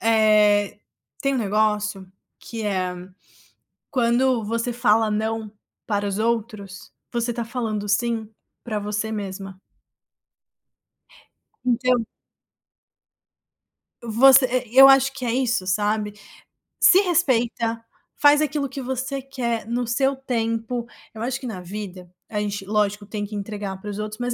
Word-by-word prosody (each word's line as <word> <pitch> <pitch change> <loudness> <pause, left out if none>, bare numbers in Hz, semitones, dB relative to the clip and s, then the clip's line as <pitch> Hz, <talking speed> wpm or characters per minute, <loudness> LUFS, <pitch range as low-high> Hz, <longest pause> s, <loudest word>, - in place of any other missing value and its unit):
eh, 215 -2 +3 0.4
tem 275 0 +1
um - - 0
negócio 210 -2 0 0.3
que 225 -1 -7
é: 185 -3 -1 1.0
"Quando 250 -2 +2
você 230 +3 -1
fala 225 -2 +3
'não' 220 0 -2 0.4
para 205 -1 0
os 200 +1 -2
outros, 215 -4 -3 0.2
você 240 0 -1
tá 235 0 -3
falando 220 -3 -3
'sim' 225 +1 0 0.3
pra 215 -3 -3
você 210 +1 -3
mesma". 195 -2 -6 2.0
Então 250 -1 +1 2.0
você 255 +2 +5
e 235 +3 -12
eu 270 0 +11
acho 270 0 +5
que 265 -2 -7
é 235 - 0
isso, 245 -6 0
sabe? 210 +2 0 0.7
Se 370 - +7
respeita, 240 - +1 0.3
faz 290 +1 +5
aquilo 290 -2 -1
que 270 +1 -6
você 265 +2 -3
quer 240 -5 -3
no 240 +1 -1
seu 270 +3 +1
tempo, 235 -2 -2 0.3
eu 220 - -9
acho 250 +2 -2
que 260 - -6
na 190 -5 -6
vida 185 -1 -8 0.2
a 210 - -2
gente, 205 -1 -3
lógico, 205 0 0
tem 205 0 -4
que 210 +1 -8
entregar 200 -2 -5
pros 205 +1 -6
outros, 215 0 -5
mas 245 0 -1
225 Hz, 130 wpm, -23 LUFS, 210-250 Hz, 2.0 s, eu